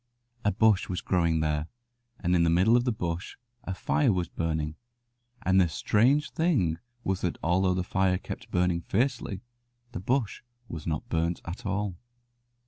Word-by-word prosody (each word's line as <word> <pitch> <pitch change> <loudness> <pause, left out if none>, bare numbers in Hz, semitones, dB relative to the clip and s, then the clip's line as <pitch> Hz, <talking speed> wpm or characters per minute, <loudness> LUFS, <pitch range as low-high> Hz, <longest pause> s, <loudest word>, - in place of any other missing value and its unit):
A 105 - +3
bush 105 -1 +3
was 90 - -2
growing 85 -3 +1
there, 75 0 0 0.5
and 90 -1 +1
in 85 - +4
the 85 - +3
middle 95 +8 +4
of 120 0 +3
the 125 - +2
bush 85 -4 -4 0.3
a 95 - -3
fire 135 +5 +2
was 90 -3 -1
burning, 80 -2 -2 0.7
and 95 0 +4
the 90 - +2
strange 125 - +2
thing 125 - +1 0.2
was 95 -1 -1
that 90 - -1
although 90 +2 +2
the 90 - 0
fire 95 0 +1
kept - - -7
on - - -33
burning 90 -1 +1
fiercely 115 -2 -1 0.5
the 115 - -5
bush 120 +3 -1 0.3
was 80 -4 -7
not 80 -2 -2
burnt 85 +1 0
at 85 +4 -6
all. 100 -2 -2
90 Hz, 170 wpm, -28 LUFS, 85-105 Hz, 0.7 s, in